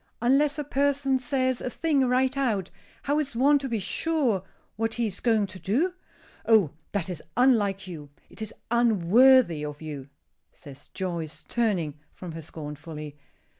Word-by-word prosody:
Unless 275 Hz, +5 st, +3 dB
a 295 Hz, -, -2 dB
person 280 Hz, -1 st, +1 dB
says 255 Hz, 0 st, 0 dB
a -, -, -3 dB
thing 280 Hz, -1 st, +1 dB
right 260 Hz, +2 st, +2 dB
out, 225 Hz, -9 st, -1 dB, 0.3 s
how 290 Hz, +2 st, +1 dB
is 280 Hz, -5 st, -3 dB
one 285 Hz, +4 st, +4 dB
to 270 Hz, -1 st, -4 dB
be 230 Hz, -, 0 dB
sure 245 Hz, -, 0 dB, 0.3 s
what 225 Hz, +1 st, -1 dB
he 235 Hz, 0 st, 0 dB
is 200 Hz, -3 st, -2 dB
going 225 Hz, -4 st, +2 dB
to 185 Hz, -1 st, -10 dB
do?" 290 Hz, -, 0 dB, 0.5 s
"Oh! 215 Hz, -10 st, +5 dB, 0.2 s
that 200 Hz, -5 st, -1 dB
is 180 Hz, -4 st, -5 dB, 0.2 s
unlike 210 Hz, -7 st, +3 dB
you. 155 Hz, -5 st, -8 dB, 0.2 s
It -, -, -12 dB
is 220 Hz, -, -2 dB, 0.2 s
unworthy 235 Hz, -, +5 dB
of 150 Hz, 0 st, -6 dB
you," 145 Hz, -4 st, -7 dB, 0.4 s
says 140 Hz, -1 st, -14 dB
Joyce, 170 Hz, -5 st, -4 dB
turning 180 Hz, -11 st, -1 dB, 0.2 s
from 180 Hz, -2 st, -8 dB
her 165 Hz, 0 st, -7 dB
scornfully. 150 Hz, -1 st, -8 dB
225 Hz, 160 wpm, -26 LUFS, 170-265 Hz, 0.5 s, Oh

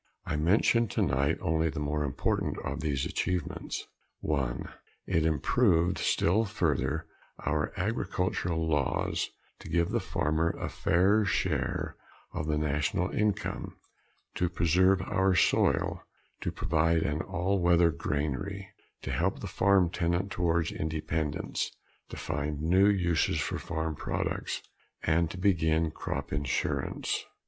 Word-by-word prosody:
I -, -, -2 dB
mention 105 Hz, +9 st, +3 dB
tonight 70 Hz, -6 st, +1 dB
only 80 Hz, 0 st, +1 dB
the 80 Hz, 0 st, -4 dB
more 75 Hz, 0 st, -1 dB
important 70 Hz, -3 st, -1 dB
of -, -, -3 dB
these 70 Hz, -3 st, 0 dB
achievements. 90 Hz, -4 st, -2 dB, 0.4 s
(1) 70 Hz, -6 st, -1 dB, 0.4 s
It 80 Hz, -1 st, +2 dB
improved 85 Hz, -, +2 dB
still 100 Hz, +7 st, +2 dB
further 80 Hz, -7 st, 0 dB, 0.4 s
our 75 Hz, +1 st, 0 dB
agricultural 90 Hz, -4 st, -1 dB
laws 75 Hz, -4 st, 0 dB, 0.3 s
to -, -, -10 dB
give 85 Hz, +1 st, +2 dB
the -, -, +1 dB
farmer 80 Hz, +2 st, 0 dB
a -, -, -3 dB
fairer 100 Hz, +5 st, +3 dB
share 80 Hz, -9 st, -1 dB, 0.4 s
of 75 Hz, -, -3 dB
the 75 Hz, -1 st, +1 dB
national 75 Hz, +4 st, 0 dB
income, 105 Hz, -2 st, -1 dB, 0.6 s
to 90 Hz, -, +1 dB
preserve 90 Hz, +3 st, +3 dB
our 95 Hz, -1 st, +2 dB
soil, -, -, +2 dB, 0.4 s
to -, -, -1 dB
provide 80 Hz, 0 st, +1 dB
an 75 Hz, +2 st, -1 dB
all 90 Hz, +3 st, -1 dB
weather 85 Hz, -1 st, +5 dB
granary, 80 Hz, +8 st, -3 dB, 0.3 s
to -, -, -3 dB
help -, -, 0 dB
the -, -, -6 dB
farm 95 Hz, -3 st, +3 dB
tenant 85 Hz, +3 st, 0 dB
towards 85 Hz, -2 st, +1 dB
independence, 80 Hz, -1 st, -2 dB, 0.4 s
to -, -, -7 dB
find 75 Hz, 0 st, -3 dB
new 90 Hz, +6 st, +4 dB
uses 90 Hz, -5 st, +2 dB
for -, -, -2 dB
farm 80 Hz, -1 st, -3 dB
products, -, -, -3 dB, 0.4 s
and 80 Hz, +1 st, +2 dB
to 95 Hz, -, -7 dB
begin 80 Hz, -4 st, +2 dB
crop -, -, -4 dB
insurance. 70 Hz, 0 st, -1 dB
80 Hz, 125 wpm, -29 LUFS, 75-90 Hz, 0.6 s, weather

